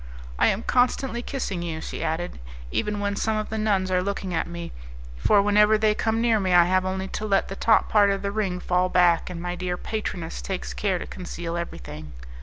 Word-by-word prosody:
"I -, -, +5 dB
am 200 Hz, +4 st, 0 dB
constantly 245 Hz, -1 st, +1 dB
kissing 225 Hz, -9 st, -3 dB
you," 165 Hz, -2 st, -4 dB
she -, -, -5 dB
added, 165 Hz, -, -3 dB, 0.3 s
"even 210 Hz, -, -1 dB
when 200 Hz, 0 st, -1 dB
some 220 Hz, +1 st, 0 dB
of 215 Hz, -, -3 dB
the 220 Hz, -, -2 dB
nuns 195 Hz, -3 st, +1 dB
are 180 Hz, 0 st, +3 dB
looking 195 Hz, -1 st, -3 dB
at 165 Hz, -, 0 dB
me, 170 Hz, 0 st, -6 dB, 0.4 s
for 200 Hz, -, +3 dB
whenever 210 Hz, +1 st, +5 dB
they 215 Hz, 0 st, +3 dB
come 220 Hz, +1 st, 0 dB
near 230 Hz, -2 st, +3 dB
me 185 Hz, -2 st, 0 dB
I 175 Hz, -1 st, +7 dB
have 185 Hz, +1 st, +2 dB
only 190 Hz, 0 st, -2 dB
to 215 Hz, -, -4 dB
let 195 Hz, -1 st, +2 dB
the 195 Hz, -, -5 dB
top 220 Hz, +2 st, +3 dB
part 205 Hz, -2 st, +4 dB
of 195 Hz, 0 st, -1 dB
the 200 Hz, -, -1 dB
ring 200 Hz, -4 st, -1 dB
fall 180 Hz, 0 st, +1 dB
back 175 Hz, -2 st, +3 dB
and 180 Hz, -2 st, -6 dB
my 175 Hz, +1 st, -3 dB
dear 180 Hz, 0 st, -3 dB
patroness 180 Hz, -7 st, -4 dB
takes 190 Hz, -2 st, -4 dB
care 195 Hz, -3 st, 0 dB
to -, -, -6 dB
conceal 170 Hz, -2 st, -6 dB
everything. 75 Hz, -, -6 dB
190 Hz, 215 wpm, -25 LUFS, 175-210 Hz, 0.4 s, I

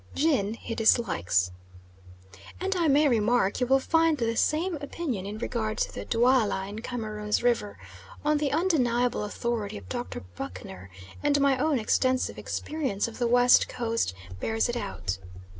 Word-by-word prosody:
Gin 260 Hz, -9 st, +1 dB
he 230 Hz, -, -6 dB
dislikes. 90 Hz, -, +2 dB, 1.1 s
And 385 Hz, +1 st, -1 dB
I 340 Hz, -3 st, +2 dB
may 295 Hz, +1 st, +5 dB
remark 230 Hz, -4 st, +2 dB
you 250 Hz, -, +2 dB
will 270 Hz, +1 st, +4 dB
find 325 Hz, +2 st, +2 dB
the 230 Hz, -2 st, -1 dB
same 325 Hz, +7 st, +1 dB
opinion 280 Hz, -, -4 dB
in 210 Hz, +1 st, -5 dB
regard 220 Hz, -1 st, -2 dB
to -, -, -1 dB
the -, -, -6 dB
Dualla 230 Hz, -5 st, +2 dB
in 205 Hz, +2 st, -6 dB
Cameroons 215 Hz, -3 st, -2 dB
river 230 Hz, -, +1 dB, 0.5 s
on 300 Hz, 0 st, +3 dB
the 290 Hz, -2 st, 0 dB
undeniable 250 Hz, -, +1 dB
authority 215 Hz, -1 st, -3 dB
of -, -, -11 dB
Dr. 245 Hz, -1 st, -4 dB
Buchner, 95 Hz, +1 st, -8 dB, 0.3 s
and 290 Hz, -1 st, +2 dB
my 275 Hz, -1 st, +4 dB
own 300 Hz, 0 st, +2 dB
extensive 255 Hz, +3 st, +1 dB
experience 270 Hz, -11 st, -2 dB
of 230 Hz, -, -9 dB
the 240 Hz, -, +2 dB
West 245 Hz, +1 st, +5 dB
Coast 230 Hz, -, -1 dB, 0.2 s
bears 225 Hz, -, 0 dB
it 240 Hz, -, -3 dB
out. 90 Hz, -, -4 dB
240 Hz, 155 wpm, -27 LUFS, 210-280 Hz, 1.1 s, may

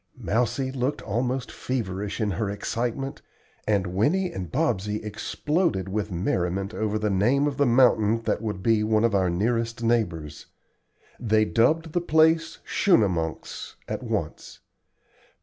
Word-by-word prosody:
Mousie 125 Hz, +4 st, 0 dB
looked 130 Hz, +2 st, -2 dB
almost 125 Hz, +4 st, -2 dB
feverish 105 Hz, -6 st, -3 dB
in 105 Hz, -2 st, 0 dB
her 100 Hz, +3 st, -2 dB
excitement, 120 Hz, +6 st, -3 dB, 0.5 s
and 100 Hz, -3 st, +2 dB
Winnie 145 Hz, -, +1 dB
and 90 Hz, -2 st, -6 dB
Bobsey 105 Hz, -8 st, 0 dB
exploded 110 Hz, -, -1 dB
with 105 Hz, +1 st, -2 dB
merriment 90 Hz, +2 st, -1 dB
over 110 Hz, -1 st, -1 dB
the 105 Hz, -1 st, 0 dB
name 120 Hz, +9 st, +3 dB
of 145 Hz, -2 st, -2 dB
the 145 Hz, -, +3 dB
mountain 115 Hz, -3 st, +4 dB
that -, -, -1 dB
would 105 Hz, -4 st, -4 dB
be 110 Hz, -2 st, +3 dB
one 110 Hz, 0 st, +2 dB
of 115 Hz, -2 st, +2 dB
our 95 Hz, -2 st, +2 dB
nearest 115 Hz, +5 st, -1 dB
neighbors. 85 Hz, -11 st, -1 dB, 0.7 s
They 110 Hz, -2 st, +2 dB
dubbed 155 Hz, +9 st, +2 dB
the 175 Hz, -, +1 dB
place 160 Hz, 0 st, +3 dB
"Schunemunks" 90 Hz, -, 0 dB
at -, -, -4 dB
once. -, -, -4 dB
110 Hz, 135 wpm, -25 LUFS, 100-130 Hz, 0.7 s, mountain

